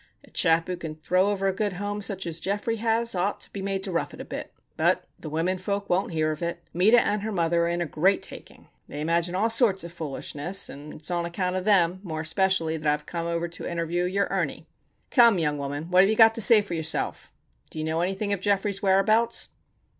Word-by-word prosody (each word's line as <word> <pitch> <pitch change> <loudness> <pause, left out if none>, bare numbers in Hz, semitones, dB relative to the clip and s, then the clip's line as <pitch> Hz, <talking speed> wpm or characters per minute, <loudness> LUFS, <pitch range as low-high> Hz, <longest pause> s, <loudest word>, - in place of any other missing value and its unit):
A - - -20
chap 165 -1 +3
who 180 - -3
can 160 -3 -6
throw 185 +5 +1
over 195 -1 -1
a 190 - +1
good 205 0 -1
home 205 +3 -4
such 195 -2 -3
as 165 -1 -2
Geoffrey 205 +5 -2
has, 230 +1 +1
ought 190 +2 -1
to - - -6
be 200 - -5
made 195 0 -2
to 195 - -4
rough 170 - -2
it - - -16
a - - -6
bit. - - -6 0.2
But - - +2 0.2
the - - -7
women 170 +5 -1
folk 200 +1 -3
won't 180 +1 +1
hear 155 -1 0
of 155 - -6
it. 170 0 -3
Meta 210 +8 +5
and 210 -2 0
her 220 +2 -3
mother 170 -2 +1
are - - 0
in 170 0 -1
a - - 0
great 185 +6 +1
taking. - - -8 0.2
They 145 - -7
imagine 170 +3 0
all 220 +4 +1
sorts 225 -6 +3
of 170 0 -8
foolishness, 160 +3 -2
and 145 +2 -9
it's 155 +3 -7
on 175 -1 0
account 180 +1 -2
of 185 0 -3
them, 185 -4 +3
more 160 -5 -5
especially, 165 -1 +1
that 155 -1 -4
I - - +4
have 150 0 -5
come 170 -1 -4
over 170 0 -1
to 170 - -6
interview 170 +1 -1
your 200 +2 +1
Ernie. - - -2 0.5
Come, 235 -6 +6
young 150 -3 0
woman! 145 +4 -5
What 180 +1 +7
have 195 - +4
you 220 - +2
got 225 0 +7
to 230 - -1
say 220 0 +7
for 195 - -7
yourself? 160 -1 -2 0.4
Do - - -10
you 155 - -2
know 160 +1 -1
anything 195 +3 -1
of 195 - -3
Geoffrey's 200 0 0
whereabouts?" 205 +4 +2
180 Hz, 240 wpm, -26 LUFS, 165-200 Hz, 0.5 s, What